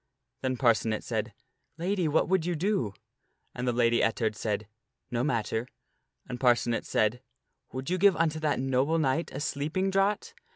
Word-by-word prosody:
Then 130 -1 -1
Parcenet 115 -3 +2
said, - - -2 0.2
" - - -49
Lady, 180 0 0
what 155 +1 +2
would 190 -2 +2
you 175 +1 -1
do?" 160 - 0 0.6
And 125 +1 -4
the - - +3
plans - - -4
against - - -5
Lady 120 -1 +3
Ettard 110 -1 +1
said, 105 -1 -2 0.2
" 130 0 -51
No 120 0 0
matter." 115 -3 -1 0.6
And 125 - -5
Parcenet 120 -2 +2
said, 110 +3 +1 0.2
" - - -48
Would 130 +5 -4
you 185 - +1
give 200 -1 +6
unto 160 -1 +1
that 150 -3 0
noble 135 +4 +1
knight 155 +1 0
a 135 - -5
sleeping 155 +6 -1
draught?" 195 +2 +1
135 Hz, 190 wpm, -29 LUFS, 120-165 Hz, 0.6 s, give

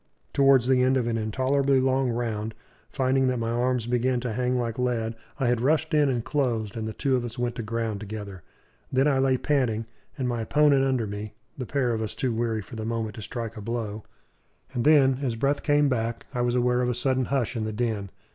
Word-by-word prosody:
Towards 135 -3 +5
the 130 0 +3
end 130 +1 +3
of 125 - 0
an 115 -1 -1
intolerably 130 +5 +1
long 130 0 +2
round, 115 -2 -2 0.3
finding 130 0 +1
that 130 -1 +1
my 115 0 -1
arms 125 0 0
began 125 +1 +1
to 120 -3 -3
hang 125 +2 0
like 120 -1 -2
lead, 120 -3 0 0.3
I 135 - +1
had 120 -1 +2
rushed 155 +4 +1
in 150 -2 +4
and 120 -3 -1
closed; 115 -8 -1
and 110 -1 -3
the 110 - -4
two 135 +1 +1
of 125 - 0
us 120 +1 -6
went 120 -1 -1
to - - -2
ground 115 -1 -2
together. 105 -3 -7 0.5
Then 135 +2 +3
I 135 -2 +3
lay 135 -1 +3
panting, 125 -6 0 0.3
and 130 -3 -1
my 120 -2 -1
opponent 145 +3 +4
under 130 -4 +1
me 105 +1 -6 0.2
the 130 -4 -5
pair 130 -4 0
of 110 - -2
us 110 - -4
too 130 -4 -1
weary 115 -2 -1
for 120 - -11
the 110 - -4
moment 110 -1 -2
to - - -6
strike 115 +1 -5
a 105 - -7
blow; 110 -1 -4 0.7
and 120 -1 -1
then, 135 -4 +5
as 125 -5 -1
breath 140 +5 0
came 145 -1 +3
back, 115 -3 -2
I 125 - -1
was 120 0 +1
aware 125 0 +2
of 125 - +1
a 125 - -1
sudden 130 +1 +1
hush 130 -2 -1
in 110 -2 -2
the 110 - -2
din. 110 -3 -2
120 Hz, 230 wpm, -26 LUFS, 115-130 Hz, 0.7 s, Towards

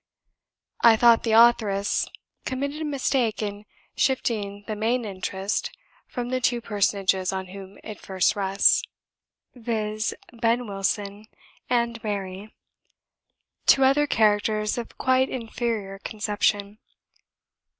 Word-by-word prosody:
I 230 -1 +7
thought 235 0 +6
the 225 - 0
authoress 220 -4 +4 0.4
committed 280 +3 -3
a - - -2
mistake 260 -6 0
in 205 0 -5 0.3
shifting 205 -6 -1
the 215 - -4
main 230 +3 0
interest 195 - -3 0.4
from 245 -1 -4
the 255 0 -1
two 245 -1 +1
personages 195 -4 0
on 190 -1 -4
whom 195 +1 -10
it 215 -2 -8
first 190 +2 +1
rests 195 0 +3 0.7
viz., 220 -2 -2 0.2
Ben 235 +1 +1
Wilson 200 +1 -3 0.4
and 235 -2 0
Mary 200 0 -4 1.2
to 270 - +6
other 280 +3 +4
characters 215 -2 +2
of 235 - -8
quite 260 0 +2
inferior 225 -5 -3
conception. 205 -1 -1
215 Hz, 110 wpm, -25 LUFS, 200-240 Hz, 1.2 s, I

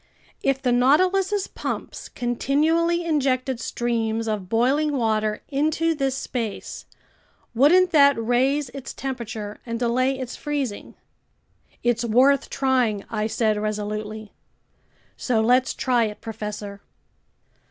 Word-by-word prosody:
If 275 -1 +1
the 250 - +2
Nautilus's 370 +11 +3
pumps - - -6
continually 315 +8 +1
injected 265 -5 0
streams 230 -2 -2
of 205 -4 -3
boiling 275 +6 +2
water 215 -2 0
into 310 +3 +1
this 270 -3 -1
space, 230 -7 -5 0.7
wouldn't 345 +9 +5
that 280 -3 +6
raise 255 +5 +1
its 270 +1 -8
temperature 225 -5 -5
and 230 -1 -4
delay 255 +3 +1
its 255 -2 -6
freezing?" 280 -8 -4 0.9
"It's 240 -1 +1
worth 255 +4 +3
trying!" 255 -7 0
I 215 -1 -1
said 220 -1 +1
resolutely. 215 0 -4 0.8
"So 240 -4 0
let's 250 +3 +3
try 245 -3 +2
it, 210 -1 -6
professor." 210 -2 -6
250 Hz, 110 wpm, -23 LUFS, 220-280 Hz, 0.9 s, that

